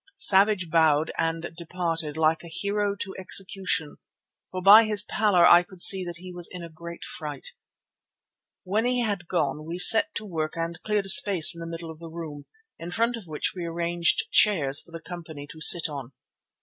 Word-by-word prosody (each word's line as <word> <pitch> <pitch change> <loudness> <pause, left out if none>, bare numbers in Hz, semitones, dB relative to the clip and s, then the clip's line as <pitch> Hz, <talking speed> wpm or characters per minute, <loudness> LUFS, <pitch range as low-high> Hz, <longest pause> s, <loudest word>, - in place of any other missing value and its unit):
Savage 200 - +1
bowed 160 -1 +1
and 165 +1 -4
departed, 165 -3 -6
like 160 0 0
a - - -11
hero 200 +4 -3
to 195 -1 -8
execution, 185 -4 -1 0.5
for 185 - -7
by 205 +4 +6
his 210 -1 +4
pallor 205 -5 +1
I 175 - +6
could 180 +1 -17
see 190 +1 +7
that 175 -1 -8
he 180 +1 -12
was 175 -1 -4
in 180 -2 -9
a 170 - -10
great 170 +2 -12
fright. 150 -3 -3 1.1
When 205 +4 -2
he 250 0 0
had 200 -6 -4
gone 150 -4 -3
we 165 +3 -8
set 225 +12 +7
to 215 - -6
work 160 -5 -5
and 165 +1 -6
cleared 210 -2 -3
a - - -1
space 185 -4 +5
in 170 - -12
the 165 - -8
middle 165 0 -9
of 155 - -15
the 165 -1 -11
room, 160 -3 -10 0.3
in 170 - -9
front 230 +6 -2
of 220 -6 -12
which 155 +5 -5
we 180 - -7
arranged 170 - -1
chairs 155 - +2
for 170 - -19
the 165 0 -10
company 165 -4 -11
to 160 - -15
sit 170 +2 +5
on. 140 -4 -10
175 Hz, 195 wpm, -23 LUFS, 160-195 Hz, 1.1 s, see